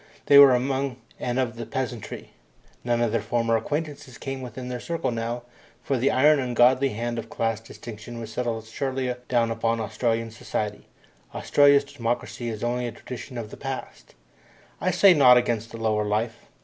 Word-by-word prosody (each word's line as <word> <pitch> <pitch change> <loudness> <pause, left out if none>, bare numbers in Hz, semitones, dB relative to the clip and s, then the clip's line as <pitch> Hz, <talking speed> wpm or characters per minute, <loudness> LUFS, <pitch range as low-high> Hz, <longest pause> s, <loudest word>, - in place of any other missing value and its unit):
They 140 -1 +8
were 140 -3 +9
among 135 0 -1 0.2
and 125 0 -2
of 120 -3 -1
the 115 - -5
peasantry. 120 -4 -5 0.5
None 120 -1 +1
of 120 -2 +1
their 115 -1 0
former 115 +1 +1
acquaintances 145 +1 -4
came 135 -1 -5
within 125 0 -7
their 125 -1 -4
circle 165 -2 -2
now, 115 +1 -3 0.4
for 140 - 0
the 130 +2 +2
iron 145 +3 +5
ungodly 130 +1 +3
hand 120 +1 -3
of - - -8
class 115 -1 -1
distinction 115 +1 -9
has 115 -1 -7
settled 115 -3 -2
surely 130 +2 -2 0.2
down 115 -2 +2
upon 115 0 0
Australian 115 +1 -1
society 110 -3 -4 0.5
Australia's 145 -1 +5
democracy 120 -2 -3
is 110 -1 -5
only 120 +1 -1
a - - -4
tradition 125 +2 -8
of 110 -2 -6
the - - -9
past. 135 -1 -7 0.7
I - - +1
say 195 -2 +6
naught 125 -5 +7
against 115 -2 0
the 115 - -8
lower 110 -1 0
life. 110 +2 -2
120 Hz, 175 wpm, -25 LUFS, 115-130 Hz, 0.7 s, were